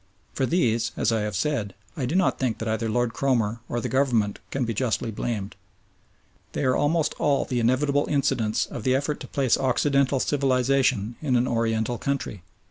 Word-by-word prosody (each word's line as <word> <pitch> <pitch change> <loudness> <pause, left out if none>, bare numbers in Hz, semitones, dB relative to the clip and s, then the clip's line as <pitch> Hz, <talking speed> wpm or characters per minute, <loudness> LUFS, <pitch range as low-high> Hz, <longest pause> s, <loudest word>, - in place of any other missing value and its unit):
For 130 - 0
these, 120 -8 +1
as - - +1
I 110 -1 +1
have 105 -2 -3
said, 105 -2 -1 0.2
I 130 -4 -2
do 160 - -2
not 185 -1 +2
think 125 -4 0
that 110 - -4
either 110 +1 -1
Lord 120 +1 0
Cromer 120 -4 0
or 120 - -1
the 125 - -3
Government 120 -5 +1
can 135 -2 -1
be 115 - -2
justly 115 0 -1
blamed. 105 -2 -4 1.0
They - - -2
are 130 -1 +3
almost 150 +1 +1
all 140 -2 +2
the 125 -2 -1
inevitable 140 +5 +2
incidents 135 -7 +1
of 120 - -7
the 130 +4 +2
effort 145 +2 -1
to - - -8
plant 135 -4 +1
Occidental 135 +1 +2
civilisation 130 -5 +1
in 135 -5 +1
an 125 +1 +2
Oriental 115 0 0
country. 140 -8 -3
125 Hz, 185 wpm, -25 LUFS, 115-140 Hz, 1.0 s, are